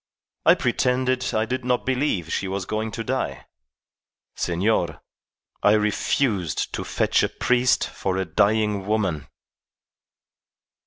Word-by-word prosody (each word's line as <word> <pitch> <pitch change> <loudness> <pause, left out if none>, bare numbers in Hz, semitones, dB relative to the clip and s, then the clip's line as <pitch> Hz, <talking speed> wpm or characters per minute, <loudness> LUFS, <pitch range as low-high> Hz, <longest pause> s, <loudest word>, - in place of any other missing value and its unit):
I - - +8
pretended 130 0 0
I 110 +1 +2
did 130 +1 -3
not 125 0 0
believe 125 - 0
she 100 - -1
was 95 -1 -3
going 110 +2 -2
to 115 - -4
die. 70 - -3 0.9
Senor, 85 -3 0 0.6
I 105 - +5
refused 105 - 0
to - - -3
fetch - - +1
a - - +1
priest 125 0 +2
for 95 -1 -3
a 95 - 0
dying 100 +3 +1
woman. 95 -10 -1
105 Hz, 120 wpm, -24 LUFS, 95-125 Hz, 0.9 s, I